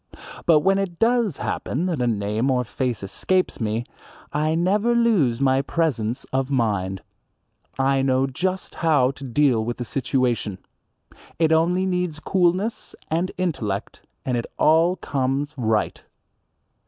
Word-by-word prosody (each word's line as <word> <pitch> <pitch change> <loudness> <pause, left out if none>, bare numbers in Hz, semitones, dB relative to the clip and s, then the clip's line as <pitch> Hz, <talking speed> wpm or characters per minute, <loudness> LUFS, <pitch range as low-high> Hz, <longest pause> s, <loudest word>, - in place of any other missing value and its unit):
But 160 -3 +6
when 195 +4 +3
it 185 -4 -3
does 230 - +2
happen 155 +8 -2
that 170 -8 -1
a 120 - +1
name 110 +3 0
or 125 -1 +2
face 120 0 -3
escapes 185 - -1
me 110 +2 -1 0.5
I 155 +2 +1
never 205 +7 +2
lose 195 - +3
my 135 -1 +3
presence 135 -6 -1
of 135 0 0
mind. 100 - -1 0.7
I 135 0 +2
know 135 0 +2
just 185 +8 -3
how 145 -6 +3
to 135 - -12
deal 130 -3 +2
with 120 +1 -3
the 120 - -4
situation. 125 -5 -1 0.8
It 160 -1 +2
only 175 +4 +3
needs 180 -4 -1
coolness 185 +5 0 0.2
and 170 +3 0
intellect, 120 - -3 0.3
and 125 - 0
it 115 - -3
all 165 +3 +4
comes 135 0 -2
right. 110 -4 0
140 Hz, 140 wpm, -23 LUFS, 120-175 Hz, 0.8 s, But